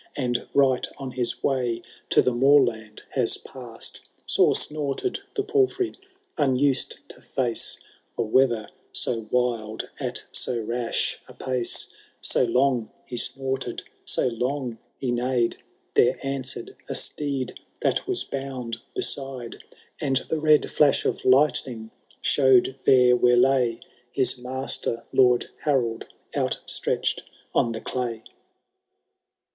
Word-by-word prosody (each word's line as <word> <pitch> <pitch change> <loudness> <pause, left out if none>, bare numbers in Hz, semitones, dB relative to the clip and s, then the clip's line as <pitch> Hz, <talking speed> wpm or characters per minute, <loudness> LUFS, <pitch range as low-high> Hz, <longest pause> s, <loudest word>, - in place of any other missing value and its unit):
And 120 -3 -1
right 135 -2 +3
on 135 -2 -6
his 125 -1 -2
way 125 -4 0 0.3
to - - +5
the 125 - +1
moorland 120 -5 +2
has 125 -4 +3
passed. 120 -4 -5 0.2
Sore - - +4
snorted 150 - -2 0.2
the 405 - 0
palfrey, 390 -3 +1 0.5
miused 135 -1 +2
to - - -12
face 120 -3 0 0.4
A - - +1
weather 115 -1 +2 0.3
so 115 -3 -1
wild 115 -3 -1
at - - -2
so 120 -2 +3
rash 115 +1 -1
a - - -14
pace; 125 -2 +1 0.3
So - - +5
long 125 -2 +1 0.2
he 125 - -7
snorted, 130 0 -1 0.2
so - - +2
loud 125 0 -2 0.2
he 130 -3 -2
neighed. 120 -1 0 0.4
There 125 +2 +4
answered 135 -1 -4
a - - -2
steed 140 -3 -1 0.2
that - - 0
was 380 -1 -1
bound 130 -4 -5 0.2
beside, 135 -4 -1 0.4
And 135 -2 0
the 160 - 0
red 155 -1 +4
flash 145 -2 +3
of - - -1
lightning 130 -4 +2 0.3
show'd 130 -1 +4
there 125 -1 +6
where 125 0 +4
lay 125 -2 +3 0.3
His 130 0 +2
master. 125 -2 -3
Lord 125 -2 +4
Harold, 120 -6 0 0.3
outstretch^ - - 0 0.3
on 115 - +2
the 110 - -6
clay. 120 -3 -4
125 Hz, 120 wpm, -25 LUFS, 120-135 Hz, 0.5 s, there